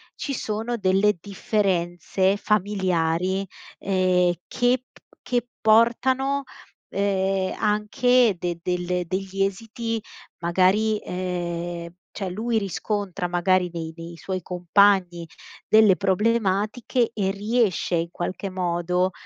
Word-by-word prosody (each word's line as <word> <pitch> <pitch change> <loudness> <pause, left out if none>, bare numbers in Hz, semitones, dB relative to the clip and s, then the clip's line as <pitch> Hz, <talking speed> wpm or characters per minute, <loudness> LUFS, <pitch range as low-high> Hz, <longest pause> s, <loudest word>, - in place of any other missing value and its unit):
ci 280 - -4
sono 225 0 -2
delle 195 0 +2
differenze 190 -2 0
familiari, 190 -3 0 0.3
ehm, 185 -2 +2
che 245 +1 +1
p - - -20 0.2
che 245 -1 -1
portano, 255 +5 +3 0.5
ehm, 195 -1 0
anche 220 +2 +3
de 175 -1 -3
delle 180 0 -1
degli 195 +1 -2
esiti 225 +3 -3 0.4
magari, 190 +5 +2
ehm, 175 -2 -4 0.2
cioè 195 -3 -4
lui 220 +5 -1
riscontra 200 -1 -3
magari 180 +1 +2
nei 160 -1 -5
nei 165 0 -9
suoi 185 +2 -4
compagni 180 0 +2 0.4
delle 215 -3 +6
problematiche 215 +4 +1
e 195 -2 0
riesce 205 -3 0
in 170 0 -1
qualche 185 +3 -4
modo 180 0 0
190 Hz, 105 wpm, -24 LUFS, 180-215 Hz, 0.5 s, delle